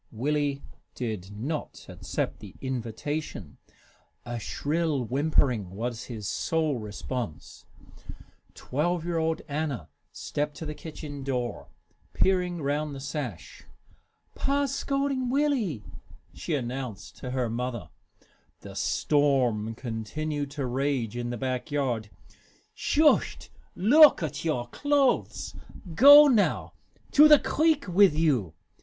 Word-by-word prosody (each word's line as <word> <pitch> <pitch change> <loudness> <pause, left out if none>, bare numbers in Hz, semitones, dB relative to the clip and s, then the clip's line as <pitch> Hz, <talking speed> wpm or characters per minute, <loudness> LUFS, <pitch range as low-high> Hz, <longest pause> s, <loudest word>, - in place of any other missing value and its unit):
Willie 140 +3 -1 0.3
did 110 -7 -4
not 145 +8 -5
accept - - -4
the - - -12
invitation. 130 - -4 0.7
A 120 0 -4
shrill 150 +3 -1
whimpering 130 - +1
was 120 +2 -4
his 110 -5 -6
sole 155 -2 0
response. 105 - -6 0.9
Twelve 165 +5 -1
year 170 -1 -1
old 160 0 -1
Anna 140 - -3 0.2
stepped 150 0 -3
to 160 - -6
the 150 - -4
kitchen 150 -3 -8
door, 125 -3 -3 0.5
peering 180 -3 +1
round 145 +1 -1
the - - -7
sash. 135 - -6 0.7
"Pa's 280 -1 0
scolding 275 -2 -1
Willie," 250 - 0 0.5
she 160 - -3
announced 120 -7 -5
to 130 - -6
her 125 -1 -1
mother. 120 0 -4 0.7
The - - -10
storm 125 -7 +1
continued 140 +6 -4
to 140 -1 -4
rage 130 -3 -1
in 120 0 -3
the 120 - -4
back 130 +3 -3
yard. 125 -7 -1 0.6
"Shust 305 0 +2 0.2
look 280 - +7
at 155 - -4
your 150 -7 -1
clothes! 285 - 0 0.4
Go 285 - +10
now! 230 -7 +1 0.4
To 300 +1 +8
the 300 -1 +9
creek 310 -1 +1
wit' 185 0 +5
you! 135 - +1
145 Hz, 115 wpm, -27 LUFS, 120-170 Hz, 0.9 s, Go